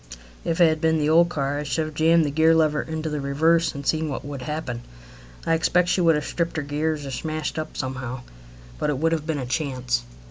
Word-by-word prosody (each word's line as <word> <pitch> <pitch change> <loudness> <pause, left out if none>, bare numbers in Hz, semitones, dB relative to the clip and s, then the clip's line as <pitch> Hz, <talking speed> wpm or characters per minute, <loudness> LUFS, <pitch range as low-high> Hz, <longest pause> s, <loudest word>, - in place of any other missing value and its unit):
If 165 +1 -1
it 170 - +7
had 155 -1 0
been 160 0 +3
the 150 0 +1
old 170 +2 +5
car 145 -3 -1
I - - -3
should 155 +2 -1
have 155 - -7
jammed 160 +1 +4
the 145 - -1
gear 160 +2 +4
lever 155 -2 +3
into 160 0 -4
the 150 -2 -2
reverse, 160 +5 +2
and 140 0 -6
seen 160 +1 +1
what 135 - -5
would 140 -2 -6
happen. 145 -4 -4 0.6
I 165 - +2
expect 175 +2 +2
she 180 - +2
would 165 -2 +5
have 150 -1 -2
stripped 170 -1 -2
her 155 - -1
gears 150 +1 -2
or 135 - -5
smashed 155 +3 -3
up 155 - -6
somehow, 130 -1 -4 0.6
but - - 0
it 145 - 0
would 165 +4 +1
have 160 -1 -1
been 160 -2 -1
a 130 - -3
chance. 125 -3 -1
155 Hz, 240 wpm, -24 LUFS, 140-160 Hz, 0.6 s, it